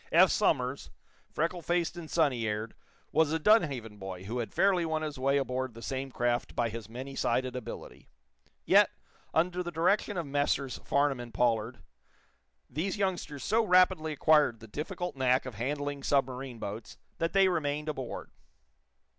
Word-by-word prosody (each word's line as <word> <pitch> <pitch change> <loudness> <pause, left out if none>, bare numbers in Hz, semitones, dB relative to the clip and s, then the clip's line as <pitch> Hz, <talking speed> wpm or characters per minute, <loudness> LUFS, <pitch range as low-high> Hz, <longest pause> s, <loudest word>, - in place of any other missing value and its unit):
Eph - - +6
Somers, - - +1 0.4
freckle 170 +3 -1
faced 175 +1 0
and 170 -3 -8
sunny 135 -9 +1
aired, 105 +1 -3 0.4
was 160 -2 +3
a 160 - +2
Dunhaven 145 - +2
boy 95 -1 -7
who 115 +6 -4
had 115 - -3
fairly 190 -3 +3
won 160 -1 -1
his 150 -3 -5
way 135 +2 +2
aboard 130 -3 -2
the 115 - -10
same 135 0 -3
craft 120 -1 -1
by 120 -1 +1
his 110 -1 -7
many 130 +4 -7
sided 130 -1 0
ability. 120 -2 -8 0.6
Yet, - - +6 0.4
under 180 +2 +1
the 175 - -4
direction 180 +5 +1
of 170 - -2
Messrs. 140 -2 0
Farnum 140 -2 +1
and 120 -1 -7
Pollard 115 +1 0 0.8
these 170 +10 -2
youngsters 175 -8 -2
so 225 +3 +2
rapidly 180 -4 +4
acquired 150 -6 +4
the 115 - -12
difficult 175 - -4
knack 130 -1 +2
of 130 - -6
handling 145 +5 -3
submarine 130 -3 0
boats 110 +1 -7 0.2
that 165 0 0
they 195 -1 +5
remained 150 -4 -1
aboard. 135 -5 -5
140 Hz, 160 wpm, -30 LUFS, 120-165 Hz, 0.8 s, Eph